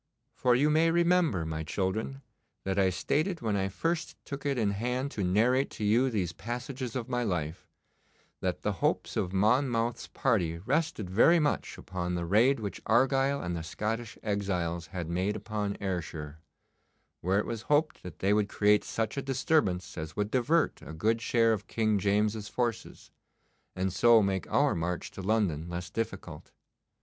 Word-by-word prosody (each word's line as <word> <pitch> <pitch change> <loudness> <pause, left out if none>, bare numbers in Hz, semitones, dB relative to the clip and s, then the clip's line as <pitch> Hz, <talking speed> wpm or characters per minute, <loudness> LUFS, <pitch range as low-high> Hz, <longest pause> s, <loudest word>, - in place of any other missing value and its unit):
For 125 -1 +2
you 145 +4 +3
may 160 +2 +4
remember, 170 - +2
my 80 0 -3
children, 105 - -2 0.4
that 95 0 -1
I 95 -1 +4
stated 155 - -1
when 110 -3 0
I 95 -1 0
first 165 - -2
took 140 0 -5
it 140 -2 0
in 105 -4 +1
hand 125 +6 -2
to 100 - -3
narrate 115 +9 +2
to - - -4
you 115 +6 +3
these 95 -7 -1
passages 125 - -5
of 125 -2 -3
my 125 -1 -1
life, 85 -7 -3 0.7
that - - -2
the - - +1
hopes - - 0
of 90 - -1
Monmouth's 115 +3 +1
party 90 -11 0
rested 125 - -1
very 115 - +5
much 150 -3 0
upon 90 -1 -4
the 85 -1 -2
raid 115 +9 +4
which 100 -4 -5
Argyle 135 +4 +3
and 85 -1 -2
the 85 - -3
Scottish 110 +6 -4
exiles 90 -5 -2
had 90 -1 -5
made 90 +5 -1
upon 105 -1 -3
Ayrshire, 80 -5 -4 0.8
where 95 +3 +1
it 105 - +1
was 115 -2 -4
hoped 150 +2 +2
that 90 -4 -9
they 100 +2 +2
would 105 -1 +1
create 105 0 +3
such 115 +4 -3
a - - 0
disturbance 130 - 0
as 80 0 -6
would 105 +1 -1
divert 150 +6 +1
a - - -9
good 110 +8 +1
share 115 -1 +3
of 105 -1 -4
King 110 -2 +1
James's 105 +2 +1
forces, 115 -2 -3 0.6
and 95 0 -1
so 115 +3 +6
make 95 -3 -2
our - - +3
march 85 +1 -3
to - - -8
London 95 -6 0
less 85 -1 -5
difficult. 115 +5 -5
105 Hz, 170 wpm, -29 LUFS, 95-125 Hz, 0.8 s, so